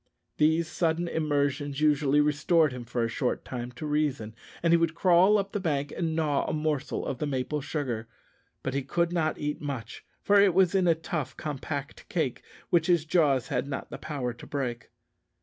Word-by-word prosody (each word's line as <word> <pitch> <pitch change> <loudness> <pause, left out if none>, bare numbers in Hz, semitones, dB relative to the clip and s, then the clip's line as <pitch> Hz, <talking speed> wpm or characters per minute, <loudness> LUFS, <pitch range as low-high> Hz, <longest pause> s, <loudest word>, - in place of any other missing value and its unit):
These 160 +2 +3
sudden 170 0 0
immersions 145 -3 -1
usually 150 -1 +3
restored 150 +1 +3
him 125 -1 -7
for 120 0 -1
a - - +1
short 120 +2 -2
time 120 -1 -5
to 155 - -7
reason, 145 -7 -1 0.3
and 170 0 +4
he - - +7
would 165 -1 0
crawl 185 +4 +5
up 195 -1 -2
the 205 - -2
bank 145 -6 -1
and 165 -2 -1
gnaw 150 -3 +1
a - - -1
morsel 150 -2 -1
of 130 - -3
the 150 - -1
maple 145 +2 -2
sugar; 130 -6 -3 0.6
but 135 - -2
he 140 - 0
could 170 +6 0
not 160 -3 0
eat 150 +1 -3
much, 140 -6 -5 0.2
for 205 0 +5
it 195 -4 +4
was 190 -1 +4
in 190 -2 +3
a 165 - +5
tough, 165 -3 -4
compact 145 -1 -5
cake, 155 -8 -1 0.3
which 170 -1 +3
his 170 -4 +3
jaws 145 -7 +2
had - - -1
not 140 - -5
power 135 -5 -3
to 120 - -13
break. 125 -5 -3
150 Hz, 190 wpm, -28 LUFS, 135-165 Hz, 0.6 s, he